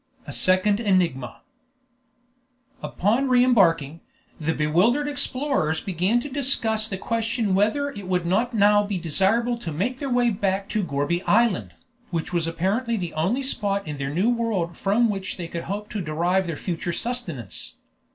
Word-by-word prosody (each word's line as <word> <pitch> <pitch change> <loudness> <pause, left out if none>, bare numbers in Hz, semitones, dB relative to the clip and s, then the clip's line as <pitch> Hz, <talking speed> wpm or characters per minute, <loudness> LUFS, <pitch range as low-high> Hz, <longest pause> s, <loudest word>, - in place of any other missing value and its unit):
A - - -7
SECOND 185 +3 +3
ENIGMA 175 - 0 1.4
Upon 235 +8 0
re 250 -1 +5
embarking, 165 - +3 0.4
the 160 +1 -1
bewildered 185 - +2
explorers 275 - 0
began 190 +5 0
to 290 - -6
discuss 245 -6 +1
the 195 - -4
question 230 -1 -1
whether 220 +9 +1
it 200 -7 -9
would 180 -2 0
not 215 +8 +1
now 205 -2 +4
be 200 -2 -3
desirable 200 +8 +1
to 170 -8 -5
make 220 - -2
their 280 - -3
way 245 -1 +2
back 195 -1 -1
to 215 - 0
Gourbi 145 +2 -1
Island, 225 -3 +2 0.3
which 170 0 -3
was 170 -2 +1
apparently 200 +8 -1
the 175 -4 -4
only 190 +13 0
spot 200 - 0
in 150 -1 -5
their 140 0 -3
new 185 +11 +1
world 215 -8 -1
from 210 +7 +2
which 195 -3 -4
they 175 -2 -5
could 170 0 -6
hope 205 +3 -4
to 210 - -3
derive 175 +4 0
their 165 -3 -4
future 175 -1 -3
sustenance. 170 - -4
200 Hz, 160 wpm, -24 LUFS, 170-235 Hz, 1.4 s, re